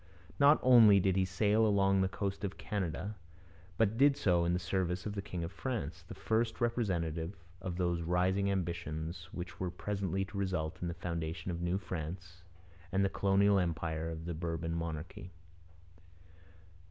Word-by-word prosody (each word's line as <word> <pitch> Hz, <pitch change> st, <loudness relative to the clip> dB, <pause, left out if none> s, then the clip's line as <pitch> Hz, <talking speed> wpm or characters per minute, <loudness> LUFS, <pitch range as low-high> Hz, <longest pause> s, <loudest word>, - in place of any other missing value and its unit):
Not 145 Hz, +2 st, +7 dB
only 115 Hz, -6 st, +8 dB
did 95 Hz, 0 st, +2 dB
he 95 Hz, -1 st, +3 dB
sail 105 Hz, +4 st, +2 dB
along 100 Hz, -2 st, +3 dB
the 95 Hz, -, +3 dB
coast 100 Hz, 0 st, -3 dB
of 100 Hz, -1 st, -3 dB
Canada, 100 Hz, +1 st, -3 dB, 0.6 s
but 110 Hz, 0 st, +2 dB
did 140 Hz, 0 st, +5 dB
so 85 Hz, -3 st, +2 dB
in 85 Hz, -, +1 dB
the -, -, +2 dB
service 90 Hz, 0 st, -1 dB
of 105 Hz, -, -3 dB
the 100 Hz, -, -3 dB
king 90 Hz, -3 st, -5 dB
of 85 Hz, -, -4 dB
France, 100 Hz, -, -4 dB
the -, -, -8 dB
first 110 Hz, +1 st, 0 dB
representative 90 Hz, -8 st, -1 dB, 0.3 s
of 90 Hz, -2 st, -4 dB
those 85 Hz, -1 st, 0 dB
rising 90 Hz, +4 st, +1 dB
ambitions 85 Hz, -2 st, -3 dB
which 90 Hz, -1 st, -7 dB
were 90 Hz, -, -1 dB
presently 95 Hz, 0 st, -2 dB
to 100 Hz, +1 st, -6 dB
result 90 Hz, -5 st, -2 dB
in 90 Hz, -, -2 dB
the 85 Hz, -, -3 dB
foundation 85 Hz, +1 st, -4 dB
of 85 Hz, 0 st, -4 dB
New 85 Hz, +2 st, 0 dB
France 90 Hz, 0 st, -6 dB, 0.5 s
and 95 Hz, +1 st, +2 dB
the -, -, +1 dB
colonial 100 Hz, +1 st, +3 dB
empire 80 Hz, -2 st, -2 dB
of 80 Hz, 0 st, -6 dB
the 85 Hz, -, -3 dB
Bourbon 80 Hz, 0 st, -3 dB
monarchy. 85 Hz, +4 st, -5 dB
90 Hz, 165 wpm, -33 LUFS, 85-100 Hz, 0.6 s, only